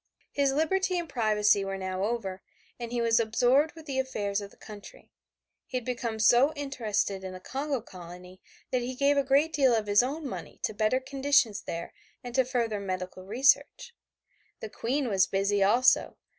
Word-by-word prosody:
His 280 -1 +1
liberty 365 +6 +1
and 340 -1 -3
privacy 210 -6 +2
were 195 0 -4
now 190 0 -3
over, 200 -4 -3 0.4
and 235 -1 -6
he 240 - -1
was 230 0 +3
absorbed 245 +7 +2
with 320 -1 -12
the 270 -3 -2
affairs 205 -6 -2
of 200 - -8
his - - -23
country. 215 - -12 0.6
He 255 - -3
had 250 - -5
become 240 -3 -3
so 245 +7 +4
interested 220 -9 -2
in 185 -1 -6
the 185 - -8
Congo 275 +5 -3
colony 180 -2 -12 0.3
that 255 - +1
he 250 +1 -4
gave 280 +2 +2
a 280 - +2
great 280 +4 +2
deal 265 -5 +4
of 220 -1 -1
his 205 +1 +4
own 285 +4 -4
money - - -8
to - - -1
better 215 +4 +1
conditions 265 -5 +1
there 170 0 -6 0.3
and 245 -1 -7
to 260 +1 +3
further 235 -4 -1
medical 185 -1 -5
research. 275 - +2 0.7
The 220 - -7
Queen 265 +3 -1
was 195 -4 +2
busy 200 +1 0
also. 240 +6 +3
235 Hz, 185 wpm, -28 LUFS, 205-275 Hz, 0.7 s, so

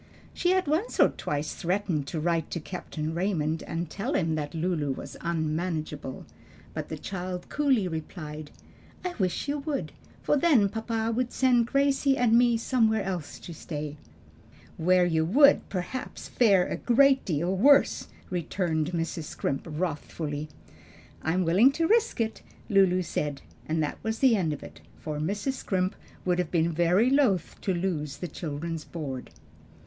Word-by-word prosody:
She 355 - 0
had 375 0 +3
once 315 +10 -1
or - - +7
twice 150 +1 -3
threatened 175 -5 -1
to 160 - -3
write 165 0 0
to 170 - -3
Captain 160 -2 -5
Raymond 165 -3 0
and 170 +1 -3
tell 220 - -3
him 160 -3 +1
that 150 0 -3
Lulu 160 -4 0
was - - -8
unmanageable, 155 -4 -3 0.5
but - - -5
the - - -4
child 180 -1 -5
coolly 270 -9 +2
replied, 155 -2 -6 0.6
"I 360 - -1
wish 185 +6 0
you 290 +1 -1
would; 285 -1 -3 0.3
for - - +3
then 270 -10 +4
papa 225 +1 -2
would 250 0 -1
send 245 -3 +3
Gracie 275 0 +2
and 235 -2 +4
me 240 -1 +5
somewhere 225 -3 +2
else 180 -6 -4
to 170 - -8
stay." 150 -2 -5 0.8
"Where 180 +2 +3
you 160 -2 +2
would, 280 - +5
perhaps, 190 +7 -5
fare 200 -7 +4
a - - -3
great 270 +2 +4
deal 170 +2 0
worse," 275 +8 +4 0.2
returned 170 -2 -1
Mrs. 165 -1 -2
Scrimp 135 -2 -2
wrathfully. 150 -2 -3 0.7
"I 160 - 0
am 185 -1 +1
willing 195 +11 +5
to 330 +3 +1
risk 455 - +2
it," 225 -1 -1 0.3
Lulu 190 -2 +4
said; 145 -4 -3 0.2
and 160 0 +1
that 150 - -3
was 220 0 -2
the 255 -3 +5
end 175 -6 0
of 150 - -5
it, 80 -1 -12 0.2
for 150 -1 -5
Mrs. 200 - -1
Scrimp 190 -7 -1 0.3
would 180 -1 +1
have 180 -3 0
been 170 -1 +2
very 175 +9 +3
loath 250 - +2
to 195 - 0
lose 165 -6 -2
the 175 - -4
children's 160 +1 -5
board. 140 -7 -6
180 Hz, 160 wpm, -27 LUFS, 160-230 Hz, 0.8 s, or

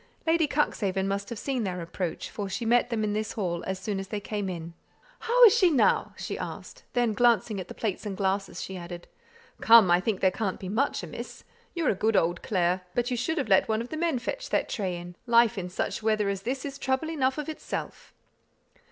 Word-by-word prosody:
Lady 325 -1 +3
Cuxhaven 195 -10 0
must 200 0 -2
have 235 - -5
seen 260 0 -2
their 180 -3 -3
approach, 170 0 -4
for 200 -2 -4
she 230 +5 -3
met 240 +2 +3
them 225 -2 -1
in 210 -1 0
this 215 +1 -2
hall 175 -5 -2
as 190 0 -2
soon 195 +1 -3
as 195 - -6
they 210 +1 -3
came 205 -1 -3
in. 170 -2 -6 0.5
"How - - +4
is 445 - +7
she 375 -6 +5
now?" 285 -7 +2
she - - -5
asked; - - -7
then 240 -3 +2
glancing 225 -3 +2
at 185 - -6
the - - -9
plates 210 -5 -3
and 200 -3 -5
glasses, 195 0 -1
she 190 - -6
added, 175 0 -8 0.5
"Come, 225 -6 +7
I 175 - +6
think 200 +1 -1
there 190 - +3
can't 195 -1 -3
be 185 - -6
much 250 +8 0
amiss! - - -8 0.3
You're 335 -3 +1
a - - +1
good 215 +3 0
old 170 -1 +2
Clare, 180 -2 +1
but 245 +1 0
you - - +1
should 320 +8 -1
have 280 - 0
let 190 - +4
one 220 0 +1
of 235 +2 -5
the - - -5
men 325 -3 0
fetch - - -4
that - - 0
tray 190 -4 -2
in; 175 0 -9
life 235 0 +5
in 180 -3 -4
such 180 - -3
weather 215 -2 +1
as 195 -1 -2
this 255 +5 -3
is 280 0 -6
trouble 265 +5 -1
enough 265 -4 0
of 300 - -4
itself." 315 - -6
215 Hz, 230 wpm, -27 LUFS, 190-255 Hz, 0.5 s, is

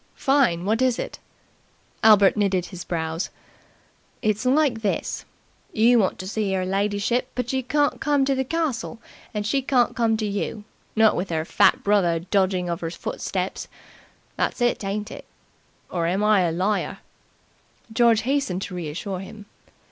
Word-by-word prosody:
"Fine! 260 - +2
What 220 +4 +1
is 255 -2 +2
it?" - - -5 0.8
Albert 205 -3 +6
knitted 195 -4 +1
his 185 -1 -8
brows. 165 -1 -3 0.9
"It's 215 +3 0
like 265 -4 +2
this. 210 - -2 0.5
You 235 +2 +5
want 190 -3 +1
to 185 - -7
see 205 -1 -1
'er 185 - -1
lidyship, 205 +5 0
but 250 0 -2
you 265 - +1
can't 290 +3 0
come 290 -3 +2
to 275 - +2
the 265 0 0
castle, 265 -6 -2 0.3
and 210 -1 -3
she 270 +6 +1
can't 255 -2 +2
come 225 -2 +2
to 215 - -2
you 205 +1 -3 0.3
not 220 -1 +5
with 180 0 -3
'er 160 -1 -1
fat - - +3
brother 195 -5 +3
dogging 185 +1 0
of 170 +1 -3
'er 165 - -2
footsteps. 170 - -4 0.7
That's - - -1
it, 240 -3 +1
ain't 205 +2 -3
it? - - -9 0.7
Or 170 -2 -1
am 190 +4 0
I 210 -3 +4
a - - -2
liar?" 190 +5 -1 1.0
George 230 -2 +4
hastened 255 -8 -1
to - - -7
reassure 180 +3 -4
him. 205 +2 -10
210 Hz, 160 wpm, -24 LUFS, 185-240 Hz, 1.0 s, Albert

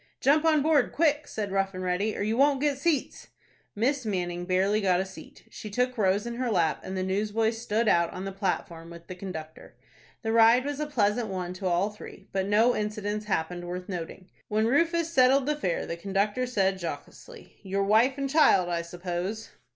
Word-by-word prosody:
"Jump 300 +3 +3
on 310 -3 +4
board 305 -4 +3
quick," 300 -2 +1
said 205 -3 -4
Rough 195 0 0
and 185 - -5
Ready, 185 +4 -1
"or - - -2
you 215 +2 0
won't 275 +2 +3
get 285 -1 0
seats." 305 -2 -1 0.5
Miss 260 +5 0
Manning 175 -4 -3
barely 195 +3 +1
got 185 -3 +2
a 190 - -1
seat. 190 0 -13
She 215 - -8
took 250 +4 0
Rose 200 -2 +1
in 235 0 -5
her 250 -1 -1
lap, 170 -7 +1
and 190 0 -5
the 185 - -1
newsboy 210 +4 0
stood 225 0 -1
out 170 -4 +3
on 185 +1 -7
the 195 - -4
platform 175 -3 -3
with 170 0 -12
the - - -7
conductor. 165 -4 -9 0.5
The 225 - -1
ride 230 +3 +5
was 290 0 -3
a 300 - -2
pleasant 225 -4 +1
one 180 -2 -4
to 185 +1 -4
all 180 +4 +1
three, 210 - -12
but 190 0 -1
no 220 +4 +3
incidents 210 0 -3
happened 175 -2 -2
worth 180 +1 -5
noting. 180 0 -7 0.2
When 215 +1 +1
Rufus 335 +6 +1
settled 260 0 +4
the 300 +1 0
fare, 180 - -2
the 170 - -4
conductor 200 +7 -1
said 195 -5 0
jocosely, 445 - -9
"Your 195 0 -1
wife 225 +7 +3
and 275 -1 -1
child, 265 - +4
I 170 -1 -1
suppose?" 175 +5 -5
205 Hz, 200 wpm, -27 LUFS, 185-250 Hz, 0.5 s, ride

